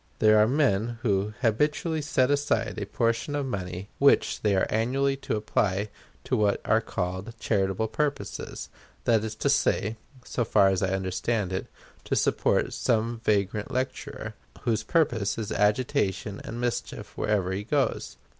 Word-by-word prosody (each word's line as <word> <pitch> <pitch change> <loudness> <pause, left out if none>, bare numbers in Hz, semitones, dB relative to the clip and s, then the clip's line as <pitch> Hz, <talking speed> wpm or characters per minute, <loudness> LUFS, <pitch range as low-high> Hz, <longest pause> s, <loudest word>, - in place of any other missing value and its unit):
There 110 0 +5
are 105 - +5
men 120 -4 +1
who 105 -1 0
habitually 150 +7 +1
set 140 -2 +2
aside 145 0 0
a - - -4
portion 115 +5 0
of 145 -1 -1
money 95 -4 -5
which 140 0 +4
they 105 -2 +2
are 95 - +3
annually 135 +5 +1
to 135 - -3
apply 105 -1 0 0.3
to - - 0
what 105 -1 +2
are - - +3
called 95 +6 -4
"charitable 100 0 0
purposes" 145 +6 -3 0.3
that 115 -2 +3
is 110 - -4
to - - -1
say, 110 +3 +1 0.3
so 120 - -1
far 100 -3 +4
as 95 -1 0
I 95 - +1
understand 95 +2 -1
it, 95 - -3 0.4
to - - 0
support - - +1
some 115 +1 0
vagrant 105 -1 0
lecturer, 130 +1 -4 0.3
whose 110 -3 0
purpose 120 - +1
is 110 -3 -4
agitation 105 -2 0
and 115 - -6
mischief 120 -1 -3
wherever 100 -4 0
he 95 +2 -2
goes. 120 - -1
110 Hz, 155 wpm, -27 LUFS, 100-125 Hz, 0.4 s, There